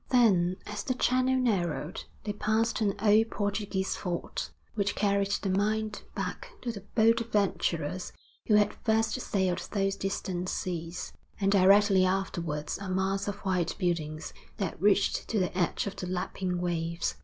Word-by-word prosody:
Then 190 -8 +4
as 210 0 -4
the 255 - -1
channel 255 +1 +2
narrowed, 180 -10 -1 0.2
they 205 - -2
passed 220 +2 +1
an 200 -2 +2
old 220 +1 +5
Portuguese 205 -2 -1
fort 175 -3 -3 0.2
which 200 -2 0
carried 200 -1 +2
the 200 -1 -1
mind 215 +2 0
back - - -4
to 240 - -1
the 205 -3 -8
bold 230 0 +5
adventurers 185 -6 -1 0.4
who 215 - +5
had 210 0 +4
first 220 0 +1
sailed 190 -5 0
those 195 -1 +1
distant 185 -2 -3
seas, 170 -1 -4 0.3
and 195 -1 +2
directly 195 0 +6
afterwards 170 -5 -1
a 195 -1 -5
mass 190 +1 0
of 200 - -1
white 180 -3 0
buildings 160 -4 -2 0.2
that 190 -5 -3
reached 200 0 +3
to 225 - -1
the 185 -2 0
edge 180 -2 0
of 200 - -4
the 180 - -4
lapping 180 0 -2
waves. 170 -1 -1
195 Hz, 155 wpm, -29 LUFS, 180-210 Hz, 0.4 s, directly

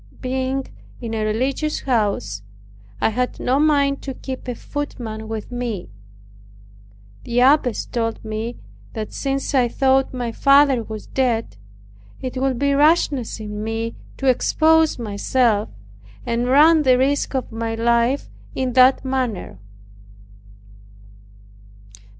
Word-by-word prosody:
Being 260 +1 -2 0.4
in 230 -2 -5
a 220 -1 -1
religious 260 +8 -1
house, 200 - -1 0.6
I - - +2
had 250 +3 -2
no 260 +3 +1
mind 285 -2 +2
to 270 -2 -6
keep 260 -1 -7
a 245 - -3
footman 230 -7 -6
with 220 +1 -6
me. 235 - -4 1.3
The 240 +1 0
abbess 260 -3 +3
told 225 -2 -3
me, 220 +2 -4 0.4
that 220 -2 -5
"since 275 0 -2
I 255 -3 +4
thought 265 +2 +2
my 245 -2 -3
father 275 0 +4
was 220 -1 -8
dead, 235 - -1 0.6
it 255 0 -5
would 265 -1 0
be 280 +2 +1
rashness 285 -5 +2
in 210 -1 -6
me 225 +1 -3 0.2
to 270 - -5
expose 315 +5 +3
myself, 220 0 0 0.6
and 235 +1 -1
run 305 +5 +6
the 260 -3 +4
risk 275 +2 0
of 260 - -2
my 225 0 -3
life 235 +3 +1 0.3
in 260 -2 -1
that 260 +2 +5
manner. 255 - -3
250 Hz, 125 wpm, -21 LUFS, 225-270 Hz, 1.3 s, run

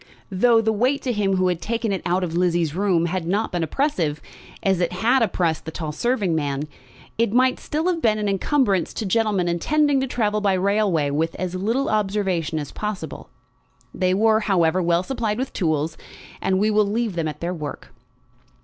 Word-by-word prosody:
Though 225 +4 +4
the 220 0 +1
weight 255 +6 +1
to 255 - 0
him 200 -4 +1
who 185 0 +2
had 175 -2 -1
taken 230 +2 -2
it 190 - -2
out 180 +2 +1
of 165 -2 -3
Lizzie's 170 -3 +1
room 180 -2 +1
had 170 -1 -2
not 205 +5 0
been 175 - -1
oppressive, 165 - 0 0.4
as 190 -2 +2
it 175 -1 0
had 240 +8 +2
oppressed 170 -8 0
the - - -4
tall 160 -1 -4
serving 205 - 0
man, 145 -3 -1 0.6
it 230 -3 +2
might 255 +2 +3
still 310 +2 -3
have 355 -2 0
been 215 -2 +2
an 210 -1 -1
encumbrance 200 - +1
to 220 - -3
gentlemen 205 -3 +1
intending 285 - +2
to 265 - -1
travel 215 -4 0
by 200 -2 +2
railway 190 -6 +1
with 160 +3 -1
as 180 0 -4
little 225 +9 0
observation 195 -6 0
as 145 -2 -4
possible. 210 -6 -5 0.6
They 185 0 +1
were, 220 +2 +4
however, 185 -4 +2
well 170 0 +2
supplied 220 -2 -2
with 260 +2 -3
tools, 155 -3 -1 0.4
and 190 - +1
we 210 +3 +2
will 210 -1 +3
leave 220 0 -1
them 165 -2 -2
at 150 -1 -6
their 175 +1 -2
work. 150 -4 -7
195 Hz, 195 wpm, -22 LUFS, 170-225 Hz, 0.6 s, Though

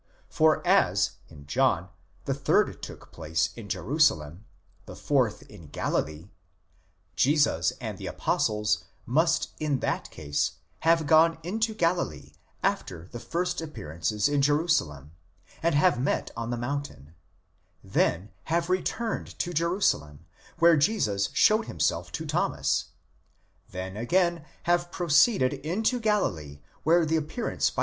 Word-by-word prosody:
For 160 +2 +2
as, 100 - +3 0.2
in 75 -3 -14
John, 95 - +1 0.4
the 135 - 0
third 135 0 +1
took - - -10
place 80 +1 -1
in 110 -4 -9
Jerusalem, 95 - +1 0.4
the - - -9
fourth 130 -7 0
in 90 -7 -14
Galilee: 75 +4 -3 0.8
Jesus 145 +2 +2
and - - -6
the - - -6
apostles 105 -1 0 0.2
must 160 +6 +1
in 150 -3 0
that - - -2
case 75 -1 -2 0.3
have 165 0 +3
gone 160 +2 +5
into 220 +5 -1
Galilee 75 - -1 0.3
after 85 +2 -2
the 120 - -6
first 175 +6 -2
appearances 100 - -2
in 145 -1 +1
Jerusalem, 140 - +1 0.5
and 170 -2 +1
have 145 -4 +3
met 135 - -1
on 115 0 -4
the 120 - -2
mountain; 120 - -5 0.7
then 95 0 0
have 170 +2 0
returned 220 +5 -2
to 175 - -2
Jerusalem 150 - 0 0.3
where 170 -1 +6
Jesus 105 - +1
showed 215 +1 +4
him 85 - -8
self - - 0
to - - -4
Thomas; - - 0 0.8
then 95 +1 -6
again 170 - +1 0.2
have 175 0 +1
proceeded 170 - +3
into 215 - -1
Galilee 90 - -1 0.2
where 165 +1 +4
the 160 +1 +1
appear 160 +10 -3
ance - - +1
by. - - -6
145 Hz, 130 wpm, -27 LUFS, -, 0.8 s, where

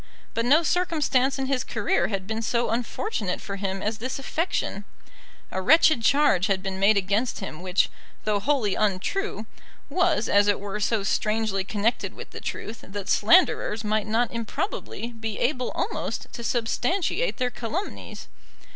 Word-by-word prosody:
But 230 - 0
no 295 +7 +5
circumstance 295 -6 +1
in 270 - -1
his 265 -2 0
career 220 -3 0
had 195 -3 -3
been 220 +2 -3
so 235 +1 0
unfortunate 230 - -2
for 200 -2 -6
him 195 -1 -3
as 215 +1 -2
this 255 +3 -3
affection. 275 - -2 0.7
A 190 - -2
wretched 310 - +5
charge 225 -6 +4
had 190 -1 0
been 190 -1 -3
made 200 +2 +5
against 200 +5 0
him 175 -4 -6
which, 185 +1 +2 0.4
though 210 -1 +1
wholly 240 -4 +1
untrue, 215 - -1 0.5
was 355 - +2
as 205 0 +4
it 205 - +3
were 205 +1 -4
so 210 0 +1
strangely 215 -1 0
connected 210 +4 -1
with - - -10
the - - -8
truth, 225 +1 -6
that 195 0 -6
slanderers 225 - +4
might 215 0 0
not 230 +2 +1
improbably 235 - -4
be 225 -2 -5
able 250 -1 0
almost - - -2
to 235 - -6
substantiate 345 - 0
their 250 -1 0
calumnies. 295 - -5
225 Hz, 155 wpm, -25 LUFS, 200-265 Hz, 0.7 s, no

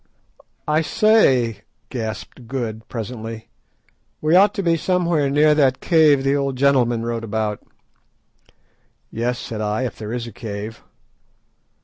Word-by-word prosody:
"I 155 +1 +2
say," 135 - +3 0.3
gasped 115 0 -6
Good, 115 -4 -5
presently, 115 -1 -6 0.7
"we 155 +3 +2
ought 200 +3 +6
to 200 - -2
be 170 -2 +3
somewhere 170 -4 +1
near 150 +2 +4
that 135 -4 +2
cave 155 -5 +4
the 135 +1 +2
old 140 -2 -1
gentleman 125 -4 +2
wrote 115 -1 -3
about." 110 -1 -2 1.5
"Yes," 120 +2 -2
said 115 -4 -6
I, 105 +3 -1
"if 125 - -5
there 110 0 -6
is 120 -1 -3
a 115 - -8
cave." 110 0 -7
125 Hz, 130 wpm, -21 LUFS, 115-150 Hz, 1.5 s, ought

